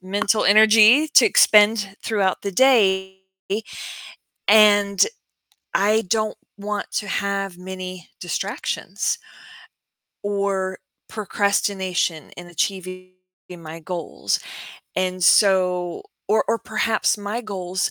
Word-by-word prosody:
mental 200 Hz, +3 st, 0 dB
energy 220 Hz, +7 st, +6 dB
to 305 Hz, -, +6 dB
expend 210 Hz, -, +4 dB
throughout 200 Hz, -4 st, -1 dB
the 200 Hz, -, -5 dB
day, 190 Hz, -6 st, +3 dB, 1.3 s
and 205 Hz, -2 st, +5 dB, 0.7 s
I 215 Hz, +3 st, +2 dB
don't 215 Hz, +2 st, -1 dB, 0.2 s
want 205 Hz, 0 st, -5 dB
to 210 Hz, -, -3 dB
have 195 Hz, -2 st, -3 dB
many 185 Hz, -1 st, -8 dB
distractions 195 Hz, -, -3 dB, 1.1 s
or 200 Hz, -2 st, -2 dB, 0.3 s
procrastination 195 Hz, -5 st, -2 dB
in 175 Hz, -, -10 dB
achieving 185 Hz, +1 st, -4 dB, 0.4 s
my 165 Hz, 0 st, -10 dB
goals. 165 Hz, -, -3 dB, 0.6 s
And 185 Hz, 0 st, -2 dB
so 180 Hz, -3 st, +3 dB, 0.3 s
Or 215 Hz, +2 st, +2 dB
or 230 Hz, -, +1 dB
perhaps 220 Hz, 0 st, 0 dB
my 205 Hz, +4 st, -4 dB
goals 190 Hz, -4 st, -3 dB
200 Hz, 95 wpm, -21 LUFS, 185-210 Hz, 1.3 s, energy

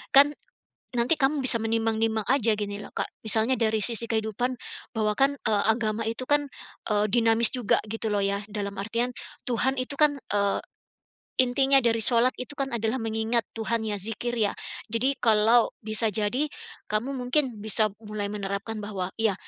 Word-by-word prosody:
kan, 285 Hz, +1 st, +8 dB, 0.7 s
nanti 235 Hz, +7 st, +3 dB
kamu 275 Hz, 0 st, +1 dB
bisa 240 Hz, -, +6 dB
menimbang-nimbang 225 Hz, -1 st, 0 dB
aja 235 Hz, -5 st, +3 dB
gini 205 Hz, -1 st, -4 dB
loh -, -, -10 dB
Kak -, -, -1 dB, 0.2 s
misalnya 220 Hz, +3 st, +3 dB
dari 220 Hz, -2 st, +1 dB
sisi 230 Hz, -1 st, +1 dB
kehidupan 225 Hz, +3 st, -1 dB, 0.4 s
bahwa 215 Hz, -1 st, +1 dB
kan, 280 Hz, +1 st, +3 dB
eee, 210 Hz, -2 st, +3 dB
agama 220 Hz, -1 st, 0 dB
itu 230 Hz, +3 st, -4 dB
kan, 290 Hz, 0 st, +1 dB, 0.4 s
eee, 210 Hz, 0 st, +2 dB
dinamis 230 Hz, 0 st, +4 dB
juga 245 Hz, -5 st, +2 dB
gitu 220 Hz, +1 st, -4 dB
loh 205 Hz, -1 st, 0 dB
ya 200 Hz, +1 st, 0 dB
dalam 200 Hz, -1 st, -4 dB
artian 235 Hz, +4 st, -2 dB, 0.3 s
Tuhan 260 Hz, +2 st, 0 dB
itu 255 Hz, +3 st, -2 dB
kan, 295 Hz, -2 st, +4 dB
eee, 200 Hz, -5 st, -1 dB, 0.8 s
intinya 270 Hz, +2 st, +3 dB
dari 230 Hz, -1 st, +2 dB
shalat 235 Hz, +3 st, +3 dB
itu 255 Hz, +3 st, -6 dB
kan 275 Hz, -1 st, -3 dB
adalah 230 Hz, +1 st, -1 dB
mengingat 225 Hz, +1 st, +1 dB, 0.2 s
Tuhan 225 Hz, 0 st, -1 dB
ya 210 Hz, -2 st, -2 dB
dzikir 230 Hz, +4 st, -1 dB
ya 210 Hz, -2 st, +1 dB, 0.3 s
jadi 250 Hz, +5 st, 0 dB
kalau 225 Hz, +1 st, +3 dB
bisa 215 Hz, +1 st, +2 dB
jadi 215 Hz, +7 st, 0 dB, 0.4 s
kamu 215 Hz, +6 st, -2 dB
mungkin 250 Hz, -2 st, 0 dB
bisa 215 Hz, 0 st, +3 dB
mulai 210 Hz, -2 st, -5 dB
menerapkan 200 Hz, +2 st, -4 dB
bahwa 200 Hz, -3 st, -4 dB
iya, 220 Hz, -3 st, +2 dB
225 Hz, 165 wpm, -26 LUFS, 215-250 Hz, 0.8 s, kan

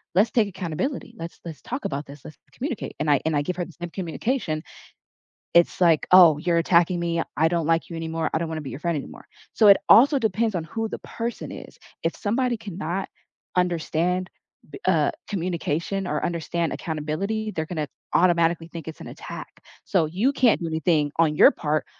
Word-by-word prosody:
let's 210 Hz, +4 st, +4 dB
take 225 Hz, -4 st, +3 dB
accountability. 190 Hz, -, -4 dB
Let's 165 Hz, +1 st, -7 dB
let's 160 Hz, -4 st, -8 dB
talk 255 Hz, +4 st, -5 dB
about 140 Hz, +1 st, -3 dB
this. 140 Hz, 0 st, -12 dB
Let's 155 Hz, -, -10 dB, 0.2 s
communicate." 255 Hz, -4 st, -4 dB
And 150 Hz, 0 st, 0 dB
I 140 Hz, -, +4 dB
and 160 Hz, -1 st, +1 dB
I 145 Hz, -, +2 dB
give 180 Hz, -, -3 dB
her 175 Hz, -, -2 dB
the 175 Hz, -, -14 dB
same 175 Hz, -, -4 dB
communication. 180 Hz, -, -2 dB, 0.9 s
It's 170 Hz, +1 st, +4 dB
like, 165 Hz, -3 st, +4 dB
"Oh, 175 Hz, -5 st, +8 dB
you're 170 Hz, +1 st, +1 dB
attacking 170 Hz, +1 st, +3 dB
me. 170 Hz, -1 st, 0 dB, 0.2 s
I 160 Hz, -, +4 dB
don't 170 Hz, -2 st, 0 dB
like 165 Hz, 0 st, +1 dB
you 170 Hz, -, -6 dB
anymore. 160 Hz, 0 st, -2 dB
I -, -, +1 dB
don't 165 Hz, -1 st, -3 dB
wanna 160 Hz, -1 st, -4 dB
be 135 Hz, -, -7 dB
your 135 Hz, -, -7 dB
friend 170 Hz, -2 st, 0 dB
anymore." -, -, -9 dB, 0.3 s
So, 215 Hz, -, +5 dB
it 200 Hz, -, +9 dB
also 280 Hz, +4 st, +7 dB
depends 220 Hz, -1 st, 0 dB
on 165 Hz, -2 st, -2 dB
who 225 Hz, +5 st, -3 dB
the -, -, -5 dB
person 235 Hz, +1 st, -5 dB
is. -, -, -10 dB, 0.3 s
If -, -, 0 dB
somebody 240 Hz, +2 st, 0 dB
cannot 190 Hz, -2 st, -4 dB, 0.5 s
understand 180 Hz, +1 st, 0 dB, 0.4 s
b -, -, -9 dB
uh, -, -, +3 dB, 0.2 s
communication 180 Hz, 0 st, -2 dB
or 150 Hz, -3 st, -2 dB
understand 170 Hz, 0 st, -2 dB
accountability, 175 Hz, +8 st, -3 dB
they're 160 Hz, -3 st, -3 dB
gonna 155 Hz, -4 st, -3 dB, 0.3 s
automatically 170 Hz, -1 st, +3 dB
think 165 Hz, -1 st, -8 dB
it's 160 Hz, -, -9 dB
an -, -, -9 dB
attack. -, -, -9 dB, 0.2 s
So, 175 Hz, -5 st, +2 dB
you 200 Hz, -, +1 dB
can't 250 Hz, -7 st, +3 dB
do 170 Hz, -, -3 dB
anything 160 Hz, -2 st, +1 dB
on 155 Hz, -2 st, +3 dB
your -, -, +8 dB
part, 150 Hz, 0 st, -1 dB
170 Hz, 195 wpm, -24 LUFS, 160-195 Hz, 0.9 s, it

